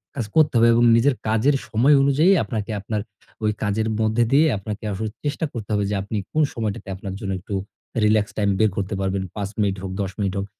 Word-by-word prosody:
কাজ 120 -5 -2
করতে 155 -2 +4
হবে 115 0 +6
এবং 120 +1 +4
নিজের 125 +4 +3
কাজের 110 +6 +3
সময় 120 +7 +4
অনুযায়ী 140 +6 +4
আপনাকে 110 -2 -4
আপনার 105 +1 -3 0.4
ওই 105 - +2
কাজের 110 +1 0
মধ্যে 110 +2 +2
দিয়ে 150 +4 +5
আপনাকে 105 +2 -6
আসলে 110 +3 -3
চেষ্টা 150 +2 -1
করতে 110 -4 -6
হবে 105 -1 +1
যে - - 0
আপনি 100 +2 -4
কোন 155 - +2
সময়টাতে 110 -3 -4
আপনার 95 0 -6
জন্য 100 -3 -4
একটু 95 +3 -8 0.5
রিল্যাক্স 105 0 +2
টাইম 100 -2 +2
বের 110 0 +4
করতে 100 0 -2
পারবেন। 95 0 -1
৫ 100 -2 -3
মিনিট 100 -2 +1
হোক, 95 -1 -5
১০ 95 -1 -2
মিনিট 100 -2 0
হোক। 100 - -3
110 Hz, 210 wpm, -22 LUFS, 100-120 Hz, 0.5 s, হবে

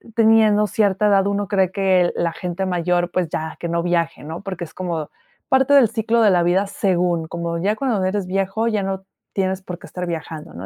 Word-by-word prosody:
teniendo 220 -2 +4
cierta 205 0 +1
edad 200 -1 +3
uno 200 -1 -1
cree 190 -3 +1
que 190 -3 +2
la 170 -1 -1
gente 180 +1 -4
mayor, 175 -1 0
pues, 180 -4 -1
ya, 160 0 -4
que 170 - -4
no 170 0 0
viaje, 170 -1 0
¿no? 160 +4 -7
Porque 185 -4 -5
es 160 - -16
como 170 -5 -4 0.4
parte 265 +1 +3
del 255 -5 +7
ciclo 230 +1 +1
de 210 - +5
la 175 -1 +3
vida 190 +3 +2
según, 180 -4 0
como 170 0 -3
ya 205 +4 +1
cuando 235 -8 0
eres 190 -1 -1
viejo 195 +4 -1
ya 210 -3 0
no 190 0 -4 0.3
tienes 190 -1 -1
por 175 -2 -7
qué - - -12
estar 180 0 -5
viajando, 160 -2 -6
¿no? 90 +3 -8
185 Hz, 215 wpm, -21 LUFS, 175-205 Hz, 0.4 s, del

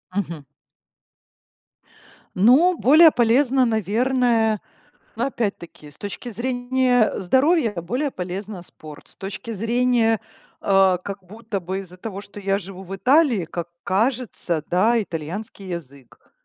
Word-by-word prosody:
Мгм. 165 -7 -3 1.9
Ну, 275 - +5
более 310 +4 +7
полезно, 250 +2 +3
наверно 225 +1 +1 0.6
Ну, 240 +4 0
опять-таки, 195 - -5
с - - -20
точки 205 +4 -7
зрения 245 0 +1
здоровья 260 - +2
более 245 - -2
полезно 185 0 -6
спорт, 155 -3 -13
с - - -16
точки 195 +4 -7
зрения, 230 0 +1 0.4
э, 195 -2 +4
как 200 -1 -6
будто 210 +1 -6
бы 185 +2 -4
из-за 180 -1 -12
того, 200 -1 -6
что 205 0 -11
я 195 0 0
живу 190 0 -9
в 195 +1 -7
Италии, 250 - +3
как 170 +1 -6 0.2
кажется, 205 - -1
да, 220 +6 +3
итальянский 190 +4 -7
язык. 140 -7 -10
210 Hz, 120 wpm, -22 LUFS, 185-245 Hz, 1.9 s, более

